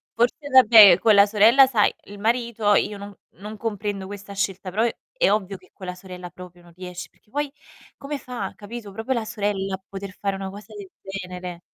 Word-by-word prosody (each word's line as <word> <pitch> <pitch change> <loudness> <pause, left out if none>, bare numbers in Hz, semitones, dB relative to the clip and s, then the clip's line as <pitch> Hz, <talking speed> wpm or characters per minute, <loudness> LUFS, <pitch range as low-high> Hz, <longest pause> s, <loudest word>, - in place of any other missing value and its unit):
Forse 245 +5 0
vabbè, 220 -8 +8
con 215 +2 +4
la 200 0 +7
sorella 220 +6 +6
sai 220 -6 +2
il 205 0 -11
marito 225 -1 +1
io 210 - 0
no 200 0 -11 0.2
non 210 +2 -8
comprendo 205 -3 -4
questa 200 0 -9
scelta, 195 -1 -3
però 210 +5 0 0.3
è - - +2
ovvio 200 -2 -1
che - - -23
con 185 - -11
la 180 0 -5
sorella 180 -1 -10
proprio 180 +1 -13
non 175 -1 -19
riesc 180 0 -8
perché - - -34
poi 290 +4 -3 0.5
come 285 +1 -5
fa, 240 -8 -6
capito. 210 0 -9
Proprio 225 +6 -3
la 235 - -2
sorella 200 -2 -2
a 190 - -14
poter 195 0 -7
fare 200 -1 -1
una 195 0 -5
cosa 205 +2 -12
del 200 -2 -9
genere. 180 -2 -7
205 Hz, 200 wpm, -23 LUFS, 190-225 Hz, 0.5 s, vabbè